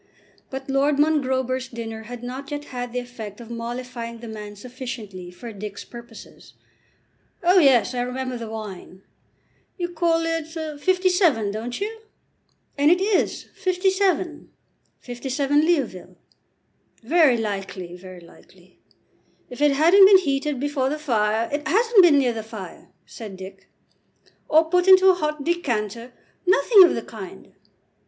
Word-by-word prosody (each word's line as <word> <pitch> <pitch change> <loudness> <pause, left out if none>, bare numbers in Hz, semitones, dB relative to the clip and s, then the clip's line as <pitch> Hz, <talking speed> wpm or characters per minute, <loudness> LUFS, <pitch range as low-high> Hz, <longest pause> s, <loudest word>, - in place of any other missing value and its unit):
But 270 0 -7
Lord 275 +1 +1
Mongrober's 260 -4 +1
dinner 225 -2 -7
had 245 +1 -9
not 260 +3 -7
yet 290 0 -5
had 245 -1 -4
the 250 - -5
effect 240 -4 -7
of 235 -1 -11
mollifying 235 0 -6
the 230 +1 -10
man 210 -1 -8
sufficiently 230 -6 -8
for 225 +6 -10
Dick's 205 0 -8
purposes. 235 -2 -13 0.9
"Oh, 360 +2 +5
yes, 265 -5 +4
I 245 - -1
remember 255 +1 -4
the 230 -2 -6
wine. 195 -3 -8 0.7
You 350 -2 -3
call 330 -1 +1
it 330 -1 -2
'57, 320 - +1
don't 230 +4 -5
you?" 445 +2 -5 0.8
"And 290 +1 +5
it 350 +2 +4
is 390 +1 0
'57; 370 -3 0 0.5
'57, 270 +4 -1
Leoville." 275 - -1 0.9
"Very 300 -1 +4
likely, 195 -4 -5
very 185 0 -12
likely. 170 - -20 0.7
If 250 - -8
it 295 -1 +4
hadn't 345 +7 +7
been 395 -1 +8
heated 285 -5 -1
before 280 -1 -1
the 300 - -2
fire 225 -6 0
" - - -17
"It 295 +1 -2
hasn't 450 +4 +5
been 335 -5 +6
near 255 -4 +2
the 225 - -4
fire," 215 -4 -10 0.2
said 210 -4 -10
Dick. 190 +1 -11 0.8
"Or 320 +1 +4
put 360 +2 +2
into 380 0 +8
a - - +7
hot 300 -4 -3
decanter 240 - -2 0.2
" - - -41
"Nothing 375 - +7
of 345 - +1
the - - -4
kind." - - -11
260 Hz, 145 wpm, -23 LUFS, 225-320 Hz, 0.9 s, been